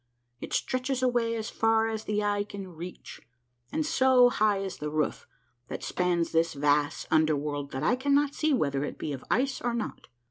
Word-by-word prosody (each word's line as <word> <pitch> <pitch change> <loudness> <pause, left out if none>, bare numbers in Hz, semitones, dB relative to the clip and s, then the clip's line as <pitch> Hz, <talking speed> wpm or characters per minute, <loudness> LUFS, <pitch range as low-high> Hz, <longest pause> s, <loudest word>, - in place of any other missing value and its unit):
It - - -7
stretches 255 0 -1
away 240 -2 +1
as 220 -1 -4
far 225 0 +2
as 220 -1 -4
the 210 0 0
eye 205 0 +1
can 200 -2 -8
reach, 175 +1 -9 0.5
and 315 - -1
so 260 -4 +5
high 210 -3 +2
is 195 -1 -4
the 150 - -4
roof 155 0 -2 0.4
that - - -6
spans 175 -2 0
this 165 +1 +2
vast 145 +1 +1
under 155 -1 +4
world 145 -1 -3
that 135 +1 -4
I 240 - +3
cannot 280 +2 +2
see 310 0 0
whether 140 - +1
it - - -5
be 150 - -4
of 135 - -7
ice 265 +1 +1
or 240 -1 -1
not. 235 - -5
205 Hz, 190 wpm, -28 LUFS, 155-245 Hz, 0.5 s, so